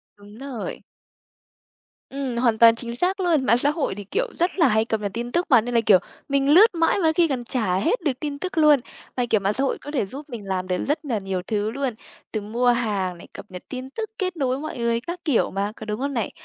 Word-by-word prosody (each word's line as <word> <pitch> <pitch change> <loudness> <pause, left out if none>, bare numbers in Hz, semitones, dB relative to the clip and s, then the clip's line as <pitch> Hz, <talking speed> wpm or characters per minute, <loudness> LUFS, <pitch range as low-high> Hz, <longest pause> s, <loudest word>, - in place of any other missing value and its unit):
Đúng 205 +1 -15
rồi. 265 -5 -6 1.3
Ừm, 265 -3 -4
hoàn 235 -2 +2
toàn 230 0 +7
chính 235 0 -5
xác 365 +8 0
luôn. 335 -7 +2
Mạng 235 - +4
xã 280 +4 +2
hội 300 - -1
thì, 205 - -7
kiểu, 465 - -1
rất 345 +2 +1
là 330 - +6
hay 220 -1 +2
cập 220 -2 -2
nhật 200 -2 -2
tin 240 +2 -4
tức 345 +1 +1
mà, 245 -5 +6
nên 245 +2 -5
là, 230 - +5
kiểu, 190 -3 +7 0.3
mình 275 0 +2
lướt 375 +6 +7
mãi 330 +4 +2
mà - - -1
có - - +1
khi 340 -2 +4
còn 255 -4 -2
chả 225 -7 -1
hết 230 - +1
được 305 -5 +1
tin 285 -1 -4
tức 370 -2 -5
luôn. 300 -3 +6 0.4
Mà, 250 - +1
kiểu, 215 - +3
mạng 195 +2 0
xã 270 - 0
hội 275 - 0
có 290 - -8
thể 270 -9 0
giúp 280 +9 -9
mình 230 -6 -7
làm 185 -1 -2
được 180 -1 -1
rất 295 +2 -1
là 235 -6 -1
nhiều 190 -2 -3
thứ 210 -1 0
luôn, 270 -2 -2 0.4
từ 215 - -2
mua 235 +4 -1
hàng 205 -7 0
này, - - -13
cập - - -9
nhật 180 -1 -9
tin 255 0 -6
tức, 440 +8 -5
kết 370 -3 -2
nối 265 -3 0
với - - -5
mọi 310 -4 -6
người 235 0 +1
các 345 +7 -6
kiểu 290 -8 +2
mà, 200 +2 -2
có 220 - -9
đúng 210 +2 -3
không 280 +1 -2
này? 230 -5 -2
245 Hz, 265 wpm, -23 LUFS, 215-295 Hz, 1.3 s, toàn